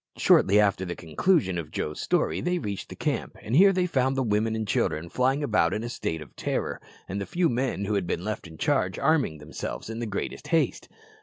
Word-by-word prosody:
Shortly 100 +2 +5
after 100 -2 +2
the 85 -2 -4
conclusion 95 - +1
of 80 -3 -6
Joe's 75 -1 -4
story 175 - +1
they 180 0 0
reached 100 - -4
the - - -8
camp, - - -2
and 115 - -2
here 195 +5 +7
they 185 -1 +1
found 135 -5 +1
the 135 - +2
women 110 0 +1
and 110 -1 -3
children 85 -3 0
flying 130 - +1
about 105 -9 +2
in 110 - -3
a 120 - -4
state 80 -8 -3
of 70 - -19
terror, - - -2 0.3
and 100 +2 -3
the 100 - -4
few 175 -1 +1
men 120 -5 -1
who 105 - -1
had 100 -4 0
been 85 - -2
left 105 -4 -4
in 80 -1 -12
charge 90 +3 +1
arming 145 - +2
themselves 75 +8 -6
in 110 - -5
the 120 - -3
greatest 100 - -4
haste. - - 0
105 Hz, 225 wpm, -27 LUFS, 90-130 Hz, 0.3 s, here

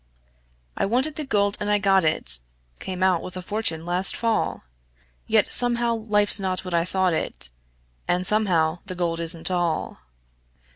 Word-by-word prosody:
I - - -1
wanted 260 +8 0
the 305 - -4
gold, 205 -6 0
and 210 0 -3
I 210 - +3
got 195 -2 +2
it 70 - +4 0.4
Came 185 -1 -5
out 185 -3 +2
with 185 - -8
a - - -5
fortune 180 -6 -3
last 180 +2 0
fall, 230 -1 -2 0.6
Yet - - +2
somehow 240 -1 +3
life's 210 -2 +2
not 190 -1 -3
what 180 - -6
I 170 0 +1
thought 185 -1 0
it, 65 - -4 0.6
And 180 +1 0
somehow 180 -6 +1
the 185 - -5
gold 170 -2 -2
isn't 165 +1 +2
all. 175 -3 -2
185 Hz, 160 wpm, -23 LUFS, 175-210 Hz, 0.6 s, it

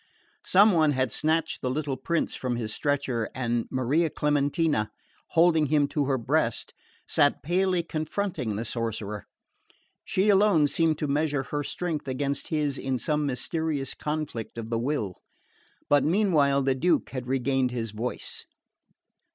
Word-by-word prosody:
Some 205 +3 +6
one 155 -4 +3
had 130 -3 0
snatched 160 +5 0
the 130 - -1
little 140 0 -2
prince 170 +4 -1
from 125 -2 -2
his 110 -2 -4
stretcher, 135 -6 -1
and 120 -2 -1
Maria 135 +6 +1
Clementina, 145 -5 +1 0.4
holding 165 -2 +4
him 145 0 +3
to 145 -2 0
her 135 -1 +1
breast, 115 - -1 0.3
sat 145 -1 +2
palely 180 +2 +1
confronting 155 - -3
the 110 +3 -3
sorcerer. 110 -3 -4 0.8
She 195 +3 +1
alone 195 -6 +5
seemed 160 +1 +2
to 150 - -2
measure 145 -1 0
her 145 +2 -3
strength 165 0 -3
against 140 +2 -2
his 150 -3 -1
in 130 -1 -1
some 150 +3 0
mysterious 145 +1 -2
conflict 150 -8 -4
of 115 0 -6
the 115 - +1
will. 115 -8 -2 0.7
But 145 -2 +4
meanwhile 155 -7 +3
the 135 0 +2
Duke 170 +7 +1
had 130 -2 -5
regained 130 0 +1
his 115 -3 -3
voice. 115 +4 -5
145 Hz, 145 wpm, -27 LUFS, 125-160 Hz, 0.8 s, Some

